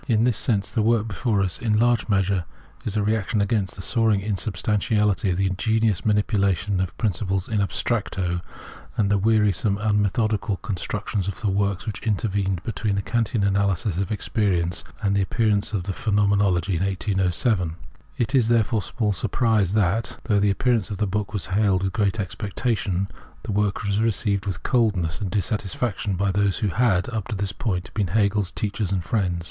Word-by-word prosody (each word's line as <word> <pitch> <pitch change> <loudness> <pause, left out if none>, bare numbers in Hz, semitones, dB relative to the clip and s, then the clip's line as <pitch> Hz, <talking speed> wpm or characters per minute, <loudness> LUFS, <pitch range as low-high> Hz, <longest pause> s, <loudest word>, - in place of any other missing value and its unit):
In 110 -2 +3
this 120 -2 +3
sense, 105 -4 0
the 115 - +1
work 115 0 +2
before 105 -1 0
us 95 - -2
is 120 - -5
in 105 -1 +3
large 120 0 +2
measure 95 -3 +1 0.5
a - - +2
re 110 +2 +2
action 110 +1 -1
against 100 -2 0
the 95 - -6
soaring 110 -2 +2
insubstantiality, 105 0 0
the 95 +2 +1
ingenious 110 +2 +1
manipulation 105 -2 +1
of 95 -2 -2
principles 95 -3 -1
in 110 -2 0
abstracto, 95 -4 -1 0.6
and 100 -2 +2
the 100 - +3
weari 105 -1 +3
some, 100 +3 0
unmethodical 105 0 +1
constructions 105 0 -3
of 100 - -4
the 105 - +1
works 100 -1 0
which 110 - -5
intervened 100 -4 -1
between 105 -2 -1
the 100 - -1
Kantian 115 -1 0
analysis 100 -2 +1
of 100 +2 -2
experience 95 -6 0 0.2
and 100 -1 +2
the 100 - +3
appearance 105 +1 +1
of 100 -5 -1
the 95 +1 -3
Phenomenology 100 -4 +2
in 90 - -1
1807. 95 -1 0 0.4
It 120 +3 -1
is, 125 -5 +4
therefore, 115 -1 +2
small 105 0 -1
surprise 105 -2 +1
that, 105 +1 +1
though 105 -3 +2
the 100 0 +3
appearance 115 +1 +1
of 105 - -4
the 105 - +1
book 105 +1 -2
was 105 -4 -3
hailed 95 -1 +2
with 95 - -1
great 105 0 0
expectation, 100 -1 -1 0.4
the - - -4
work 105 0 0
was 100 +1 0
received 105 -3 0
with 90 -5 -4
coldness 105 -8 +1
and 100 - -2
dissatisfaction 105 0 -1
by 100 +2 +1
those 100 0 +1
who 105 - 0
had, 95 -1 +2
up 110 -4 -3
to 115 - -3
this 100 -1 -2
point, 95 -7 -3
been 105 -3 0
HegeFs 100 0 +1
teachers 100 -2 -2
and 95 -3 0
friends. 90 -4 0
100 Hz, 180 wpm, -24 LUFS, 95-110 Hz, 0.6 s, is